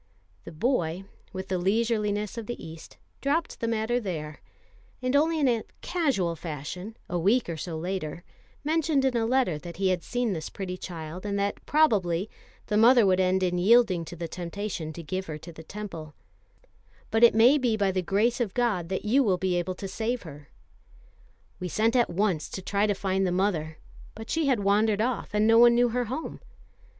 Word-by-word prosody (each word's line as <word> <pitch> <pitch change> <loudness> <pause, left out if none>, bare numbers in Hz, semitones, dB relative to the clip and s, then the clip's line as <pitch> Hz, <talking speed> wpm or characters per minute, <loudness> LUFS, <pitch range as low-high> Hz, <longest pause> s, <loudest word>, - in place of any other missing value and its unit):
The - - -8
boy, 175 - -1 0.3
with 190 0 -6
the 185 -1 0
leisureliness 210 +1 0
of 230 -3 -6
the 240 - -4
East, 160 0 -11 0.2
dropped 310 +4 -1
the 230 - -2
matter 230 +2 0
there; 155 - -5 0.6
and 255 +2 -1
only 320 +2 +3
in 285 - +3
a 235 -3 +2 0.2
casual 260 - 0
fashion, 165 +7 -7
a 175 - -2
week 215 +8 +2
or 170 - -3
so 160 +1 -5
later, 175 -1 -4 0.4
mentioned 310 -2 +1
in 260 -2 +1
a 225 -1 +1
letter 245 - +1
that 170 +1 -9
he 195 -1 +1
had 180 -2 0
seen 245 +2 -1
this 160 -3 -5
pretty 185 -2 -5
child, 170 -1 -7
and 200 -1 -2
that 200 0 -2
probably, 205 - +2 0.3
the 210 - 0
mother 235 +1 +6
would 185 -1 +3
end 185 0 +2
in 180 -1 0
yielding 205 -3 +4
to 175 - -8
the 170 0 -5
temptation 175 -1 -5
to 165 +2 -8
give 185 +5 -4
her 155 -1 -5
to 170 +2 -11
the 160 - -10
Temple 165 -5 -8 1.0
"but 225 +1 +2
it 235 - +7
may 245 +6 +6
be 240 -4 +1
by 200 -2 +2
the 185 0 0
grace 215 +7 +1
of 210 -6 -2
God 215 -9 0
that 190 +2 -3
you 250 +7 +4
will 195 -6 +2
be 185 0 0
able 175 +1 -1
to 195 - -6
save 230 +4 -2
her." 145 -3 -11 1.1
We 180 - -3
sent 225 +6 +1
at 240 -2 +3
once 180 -3 0
to 190 - -6
try 200 +2 +1
to 205 - +1
find 190 0 0
the - - 0
mother; 175 -5 -1 0.4
but 220 +1 -8
she 320 -3 +1
had 255 -6 +2
wandered 205 +1 +2
off, 245 +2 -1
and 210 +1 +3
no 225 +1 +6
one 240 0 +7
knew 245 0 +4
her 245 +1 -1
home. 265 +8 -5
200 Hz, 200 wpm, -27 LUFS, 175-235 Hz, 1.1 s, it